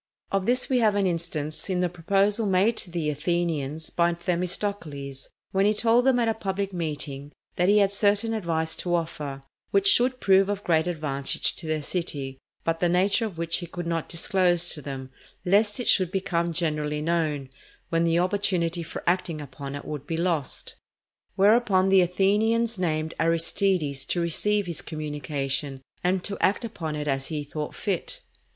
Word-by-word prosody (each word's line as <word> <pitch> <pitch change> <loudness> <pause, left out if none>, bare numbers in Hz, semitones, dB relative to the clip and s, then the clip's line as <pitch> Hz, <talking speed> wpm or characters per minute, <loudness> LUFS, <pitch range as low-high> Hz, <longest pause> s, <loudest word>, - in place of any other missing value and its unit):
Of 195 -1 0
this 250 +1 +2
we 255 -2 +2
have 215 -3 +3
an 200 -1 +2
instance 165 -2 -2
in 180 -1 0
the 180 - +2
proposal 195 +5 +1
made 195 +4 +3
to - - -3
the 165 -3 -1
Athenians 160 -1 -2
by 170 0 +2
Themistocles, 170 -6 -3 0.2
when 195 +1 +3
he 210 - +2
told 235 +3 +3
them 260 -2 +5
at 235 -2 +2
a 225 - +2
public 200 -2 -3
meeting 150 -4 -4 0.2
that 180 0 +2
he 210 - +5
had 200 -1 +3
certain 205 +2 +2
advice 165 -6 -1
to 175 -1 0
offer 150 -5 -4 0.3
which 400 0 +5
would 255 +1 0
prove 195 -2 +4
of 205 0 -2
great 160 -1 +2
advantage 150 -5 0
to 160 - -6
their 155 -1 -1
city, 140 -6 -3 0.2
but 165 0 0
the 175 - +2
nature 195 +6 +2
of 185 -6 -10
which 165 0 0
he 175 - -6
could 175 0 -6
not 165 -1 -2
disclose 175 0 +2
to 150 - -5
them, 135 -2 -7 0.3
lest 205 +4 +3
it 245 - -3
should 185 -3 +4
become 170 -3 0
generally 150 -2 -1
known, 155 -5 0 0.4
when 165 0 +2
the 165 0 +2
opportunity 180 -2 +1
for 165 - -7
acting 175 -2 0
upon 140 0 -7
it 145 - -7
would 145 -1 -6
be 165 - -2
lost. 165 -5 -1 0.6
Whereupon 200 -2 +4
the 190 -1 +6
Athenians 210 +5 +2
named 160 -2 -1
Aristides 165 -3 +1
to 175 - -1
receive 205 +5 +1
his 170 -2 -4
communication, 145 -3 -3 0.2
and 180 0 +1
to 200 - -2
act 205 +5 +2
upon 165 -9 -4
it 150 0 -4
as 135 -1 0
he 150 -2 -3
thought 150 +1 -5
fit. 210 - -3
175 Hz, 175 wpm, -26 LUFS, 155-200 Hz, 0.6 s, the